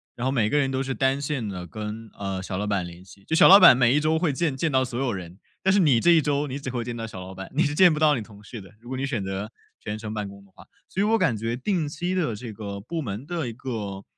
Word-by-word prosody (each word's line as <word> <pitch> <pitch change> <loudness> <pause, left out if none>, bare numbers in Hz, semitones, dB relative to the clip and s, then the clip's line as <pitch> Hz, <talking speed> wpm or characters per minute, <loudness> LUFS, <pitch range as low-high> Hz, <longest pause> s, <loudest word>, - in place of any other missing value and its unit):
然 120 - -4
后 130 - +1
每 110 -5 +2
个 150 - +1
人 140 -2 +2
都 135 0 -1
是 135 0 -3
单 135 +3 +1
线 140 -6 -3
地 90 -3 -6
跟 110 +4 -7
呃， 95 -1 -4
小 95 -1 -4
老 105 +2 -2
板 100 -4 0
联 85 +1 -11
系。 100 +1 -17
就 160 - -5
小 - - +7
老 195 - +11
板 185 -9 +9
每 125 +1 +3
一 150 - +4
周 160 +1 +1
会 165 -3 +1
见 150 0 -1
见 160 +5 0
到 130 -1 +3
所 125 0 -5
有 135 -3 0
人， 90 0 -8 0.2
但 190 0 +3
是 205 - +4
你 145 -10 +4
这 175 - +5
1 165 - +6
周 145 0 0
你 140 0 -5
只 135 - -5
会 120 -2 -3
见 120 0 -5
到 115 - -5
小 95 -4 -9
老 95 +1 -9
板， 95 0 -8
你 155 - +3
是 145 - 0
见 180 +2 +6
不 150 - -3
到 155 -1 +4
你 120 - -3
同 105 -1 -13
事 115 +3 -9
的， 95 - -14
如 120 - -13
果 130 - -4
你 135 - -2
选 120 -8 -2
择 95 +2 -4 0.3
全 105 0 -5
程 110 0 -6
办 105 -2 -3
公 100 0 -12
的 100 - -25
话。 - - -17 0.2
所 190 - -5
以 - - +3
我 225 +2 +3
感 180 - +1
觉 115 +2 -2
定 160 +4 -1
期 175 +5 -3
的 160 - 0
这 115 +2 -7
个 100 -2 -6
部 160 +10 -4
门 110 -1 -5
的 165 -4 -3
一 115 - -5
个 110 -6 -5
120 Hz, 335 characters per minute, -25 LUFS, 105-145 Hz, 0.3 s, 老